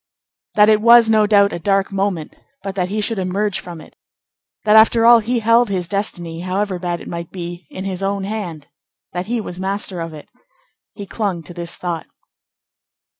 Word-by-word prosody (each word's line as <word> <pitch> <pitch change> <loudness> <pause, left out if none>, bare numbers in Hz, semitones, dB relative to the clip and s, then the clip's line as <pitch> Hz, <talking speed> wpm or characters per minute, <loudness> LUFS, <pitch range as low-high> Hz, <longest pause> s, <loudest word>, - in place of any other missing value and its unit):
That 210 0 +6
it 215 -1 +4
was, 235 0 +7
no 215 -1 +4
doubt, 200 -1 +4
a - - -4
dark 195 +3 +1
moment, 195 -5 -2 0.3
but 195 -1 -4
that 185 -2 -2
he 210 +2 -2
should 210 0 -1
emerge 190 +2 -1
from 175 -2 -9
it; - - -15 0.7
that, 210 0 +4
after 225 +1 +6
all, 235 0 +8
he 235 +3 -1
held 230 +1 +4
his 185 -3 -2
destiny, 175 -4 -3
however 185 +1 -2
bad 175 -1 -3
it - - -10
might 170 -1 -6
be, 175 -3 -8
in 190 - -7
his 190 -1 -4
own 195 0 -1
hand; 190 -8 -5 0.5
that 180 +1 -4
he 240 +1 -1
was 180 -4 -7
master 190 -2 -3
of 165 0 -5
it. 150 - -12 0.7
He 200 - -7
clung 195 -4 -3
to 175 - -10
this 175 0 -5
thought. 175 -2 -4
195 Hz, 190 wpm, -19 LUFS, 175-210 Hz, 0.7 s, all